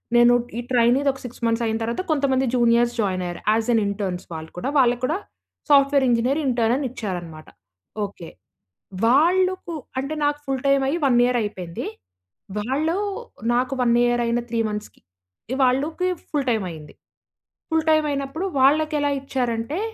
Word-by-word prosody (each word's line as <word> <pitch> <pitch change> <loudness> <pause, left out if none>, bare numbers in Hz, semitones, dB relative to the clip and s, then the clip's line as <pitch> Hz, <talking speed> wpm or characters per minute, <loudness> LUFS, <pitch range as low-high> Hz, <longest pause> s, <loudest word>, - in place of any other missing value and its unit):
నేను 240 0 +6 0.2
ఈ - - -2
ట్రైనీది 250 +4 +3
ఒక 265 - -12
6 245 0 -9
మంత్స్ 230 +1 +1
అయిన 220 0 0
తర్వాత 235 +9 -2
కొంతమంది 270 -3 +2
జూనియర్స్ 240 0 +3
జాయిన్ 185 -3 -1
అయ్యారు. 175 0 -6
యాస్ 220 +1 +1
ఎన్ 225 - +3
ఇంటర్న్స్ 195 -3 -3
వాళ్ళు 160 0 -7
కూడా. 180 - -2
వాళ్ళకి 245 -1 +3
కూడా 315 +6 0 0.5
సాఫ్ట్‌వేర్ 275 -1 +5
ఇంజినీర్ 245 +5 +2
ఇంటర్న్ 235 -2 +2
అనిచ్చారన్నమాట 185 - -5 0.6
ఓకే. 180 -4 -10 0.8
వాళ్ళకు 355 +7 +2 0.3
అంటే 275 +3 -3
నాకు 290 0 0
ఫుల్ 270 -1 -2
టైమ్ 275 0 +3
అయ్యి 335 +5 0
1 245 -3 +4
ఇయర్ 245 0 +1
అయిపోయింది. 185 -5 -5 0.7
వాళ్ళు 285 +9 0 0.6
నాకు 250 +2 +1
1 235 -1 +3
ఇయర్ 240 0 +1
అయిన 235 +1 +1
3 230 -1 -1
మంత్స్‌కి 210 0 -7 0.5
ఇ - - 0
వాళ్ళకి 295 +8 +1 0.2
ఫుల్ 285 -3 -1
టైమ్ 220 -4 0
అయింది. 155 -2 -11 0.8
ఫుల్ 320 -1 +1
టైమ్ 310 -1 +3
అయినప్పుడు 280 +5 -3 0.2
వాళ్ళకెలా 295 +1 +3
ఇచ్చారంటే 250 +2 -2
250 Hz, 150 wpm, -23 LUFS, 225-280 Hz, 0.8 s, నేను